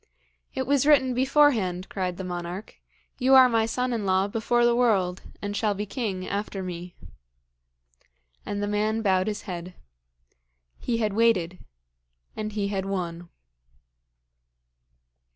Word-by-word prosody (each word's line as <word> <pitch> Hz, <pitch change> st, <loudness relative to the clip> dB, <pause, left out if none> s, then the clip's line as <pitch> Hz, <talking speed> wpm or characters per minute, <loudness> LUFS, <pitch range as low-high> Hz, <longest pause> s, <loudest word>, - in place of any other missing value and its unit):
'It 260 Hz, -, -1 dB
was 280 Hz, +1 st, +2 dB
written 260 Hz, -4 st, +5 dB
beforehand,' 245 Hz, -9 st, +2 dB
cried 180 Hz, -2 st, -3 dB
the 190 Hz, -, -5 dB
monarch. 180 Hz, +2 st, -6 dB, 0.4 s
'You 265 Hz, +1 st, +5 dB
are 260 Hz, -1 st, +9 dB
my 225 Hz, -2 st, +1 dB
son 250 Hz, +2 st, -1 dB
in 225 Hz, -3 st, -2 dB
law 190 Hz, 0 st, +2 dB
before 235 Hz, +3 st, +1 dB
the 240 Hz, 0 st, +3 dB
world, 195 Hz, -7 st, +2 dB, 0.2 s
and 205 Hz, 0 st, -3 dB
shall 210 Hz, -1 st, 0 dB
be 205 Hz, +2 st, -3 dB
king 200 Hz, -5 st, -4 dB
after 200 Hz, -1 st, -3 dB
me.' 175 Hz, -1 st, -7 dB, 1.5 s
And 205 Hz, 0 st, -3 dB
the -, -, -1 dB
man 215 Hz, +2 st, 0 dB
bowed 190 Hz, -1 st, +2 dB
his 210 Hz, -1 st, -3 dB
head. 180 Hz, -2 st, -7 dB, 1.0 s
He 235 Hz, -, -1 dB
had 215 Hz, -3 st, 0 dB
waited; 190 Hz, -6 st, +2 dB, 0.8 s
and 215 Hz, -1 st, -4 dB
he 200 Hz, -1 st, -1 dB
had 195 Hz, -2 st, -2 dB
won. 175 Hz, -3 st, -4 dB
205 Hz, 135 wpm, -26 LUFS, 185-235 Hz, 1.5 s, are